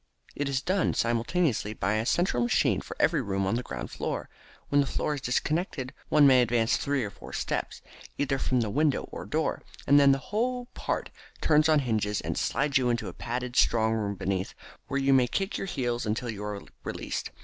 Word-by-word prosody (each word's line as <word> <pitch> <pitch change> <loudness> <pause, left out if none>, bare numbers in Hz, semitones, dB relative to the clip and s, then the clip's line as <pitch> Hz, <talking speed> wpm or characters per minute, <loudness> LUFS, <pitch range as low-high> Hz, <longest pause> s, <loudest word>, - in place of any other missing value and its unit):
It 145 -1 -1
is 135 0 -1
done 185 0 +1
simultaneously 115 - 0
by 100 +2 0
a 110 +2 -1
central 175 -5 +2
machine 120 -3 +2
for - - -9
every 155 -1 +3
room 95 -4 -1
on 95 - 0
the 120 - 0
ground - - -6
floor. - - -4 0.4
When 145 0 +4
the 140 - -1
floor 150 - -1
is 145 - -5
disconnected 135 +1 -1 0.2
one 150 -1 +6
may 130 -2 +7
advance 115 -1 +2
three 140 -2 0
or 100 - -4
four - - -12
steps, - - -3 0.3
either 135 -1 0
from 130 -2 +1
the 110 -3 -1
window 150 +4 +2
or - - -7
door, - - -1 0.2
and 145 +1 +6
then 140 -1 +6
that - - +1 0.2
whole 245 +3 0
part - - -3 0.3
turns 155 0 +4
on 155 -2 +5
a - - -4
hinge 110 -4 0 0.2
and - - -2
slides 140 -1 +1
you 125 -1 +1
into 120 -1 -1
a - - -9
padded 125 +1 -4
strong 110 -2 +3
room 105 -2 -1
beneath, 95 0 -2 0.3
where 140 - -1
you 135 0 +3
may 130 -2 +5
kick 195 - -2
your 195 - -3
heels 120 - -2
until 115 +3 -1
you 105 -1 -7
are 105 -1 -5 0.2
released. - - -4
125 Hz, 210 wpm, -28 LUFS, 115-145 Hz, 0.4 s, may